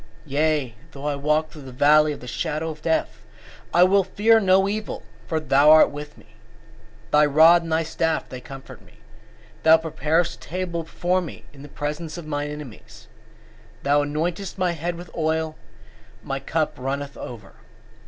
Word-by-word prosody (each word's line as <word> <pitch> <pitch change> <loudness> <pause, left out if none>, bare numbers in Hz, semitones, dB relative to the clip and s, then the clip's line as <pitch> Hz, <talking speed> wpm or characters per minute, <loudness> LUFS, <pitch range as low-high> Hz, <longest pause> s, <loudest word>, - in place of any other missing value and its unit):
23:4 145 - -16
Yea, 150 -4 +1 0.2
though 140 +1 -9
I 145 -1 0
walk 150 +2 0
through 155 - -11
the 135 -1 -10
valley 150 +4 +4
of 145 - -7
the 125 - -10
shadow 160 +4 -3
of 155 -1 -12
death, 160 0 -1 0.5
I 175 - +5
will 195 +2 +4
fear 215 +4 +3
no 190 -1 +3
evil: 210 +1 -4 0.2
for 160 - -1
thou 145 -1 +4
art 155 0 +7
with 150 0 -9
me; - - -18 0.9
thy 150 0 +5
rod 160 +4 +6
and 165 -1 -7
thy 160 +1 +2
staff 165 0 -1
they 130 - -8
comfort 135 +1 -11
me. - - -20
23:5 - - -24 0.6
Thou 160 0 +7
preparest 160 +1 0
a - - -13
table 175 0 -3
before 175 +3 -1
me 170 - -9
in 140 - -14
the 145 - -11
presence 150 +3 -5
of 170 - -8
mine 145 -1 -3
enemies: 150 -6 -11 0.7
thou 145 +1 +3
anointest 170 +7 -3
my 185 -2 +1
head 170 +1 -3
with 175 0 -10
oil; 160 -1 -1 0.7
my 135 0 -3
cup 155 +3 -1
runneth 140 +2 -4
over. 110 -5 -9
155 Hz, 180 wpm, -23 LUFS, 145-170 Hz, 0.9 s, art